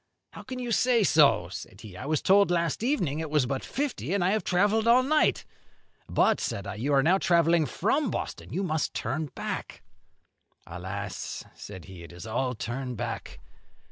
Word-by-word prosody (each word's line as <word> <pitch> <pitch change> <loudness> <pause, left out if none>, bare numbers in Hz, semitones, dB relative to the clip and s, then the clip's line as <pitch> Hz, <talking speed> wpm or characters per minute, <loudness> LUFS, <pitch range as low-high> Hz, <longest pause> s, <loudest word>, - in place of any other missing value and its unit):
'How - - -10
can 260 -1 -7
you 245 -1 -4
say 240 -1 +3
so?' 140 - +4
said 95 +2 -9
he. 105 -5 -11
'I 130 - -7
was 155 -1 0
told 200 0 +5
last 170 -1 0
evening 200 - 0
it 160 -1 -4
was 150 -3 +2
but 130 +1 -3
fifty, 275 -8 -2
and 195 - +1
I 180 - +3
have 215 +1 0
travelled 205 +5 +2
all 245 +2 +6
night.' 305 +3 +2 0.6
'But,' - - +3
said 100 - -3
I, 100 - -4
'you 120 +8 -2
are 135 -1 +4
now 180 +5 +4
travelling 170 -3 +3
from 235 - 0
Boston. - - -5
You 195 - -1
must 160 -4 -1
turn 150 +7 -2
back.' - - -5 0.8
'Alas!' 95 +4 -5
said 95 -3 -10
he, 95 -3 -11
'it 85 - -11
is 85 -1 -9
all 125 +3 -1
turn 125 +3 -4
back! - - -5
155 Hz, 185 wpm, -27 LUFS, -, 0.8 s, all